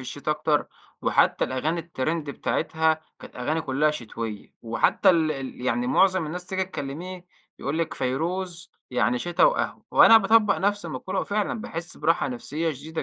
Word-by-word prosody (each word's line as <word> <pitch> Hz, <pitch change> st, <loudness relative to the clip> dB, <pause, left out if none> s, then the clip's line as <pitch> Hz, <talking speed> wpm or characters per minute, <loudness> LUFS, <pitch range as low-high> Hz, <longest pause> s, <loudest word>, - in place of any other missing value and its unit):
الشتا 135 Hz, +4 st, -4 dB
أكتر 150 Hz, 0 st, +1 dB, 0.4 s
وحتّى -, -, +3 dB
الأغاني 155 Hz, +6 st, -1 dB
الترند 155 Hz, -1 st, -3 dB
بتاعتها، 160 Hz, +2 st, 0 dB, 0.2 s
كانت -, -, -13 dB
أغاني 155 Hz, +6 st, -1 dB
كُلّها 150 Hz, +1 st, +1 dB
شتويّة 115 Hz, -6 st, -6 dB
وحتّى 115 Hz, +9 st, +3 dB
ال 160 Hz, -3 st, +2 dB
ال 135 Hz, -3 st, -7 dB
يعني 245 Hz, -, 0 dB
معظم 190 Hz, -8 st, +3 dB
الناس 180 Hz, +3 st, -5 dB
تيجي 190 Hz, 0 st, 0 dB
تكلّميه، 180 Hz, +3 st, -7 dB, 0.3 s
يقول 145 Hz, +4 st, -2 dB
لِك 165 Hz, -, -1 dB
فيروز 170 Hz, +7 st, -3 dB, 0.2 s
يعني 125 Hz, 0 st, +1 dB
شتا 175 Hz, +5 st, -1 dB
وقهوة -, -, 0 dB
وأنا 225 Hz, 0 st, +8 dB
باطبّق 210 Hz, 0 st, +4 dB
نفس 205 Hz, -2 st, 0 dB
المقولة 165 Hz, +6 st, -3 dB
وفعلًا 210 Hz, +2 st, -1 dB
باحِس 170 Hz, -6 st, -6 dB
براحة 165 Hz, -3 st, +1 dB
نفسية 150 Hz, +6 st, -3 dB
شديدة 155 Hz, +4 st, -6 dB
160 Hz, 150 wpm, -25 LUFS, 140-185 Hz, 0.4 s, وأنا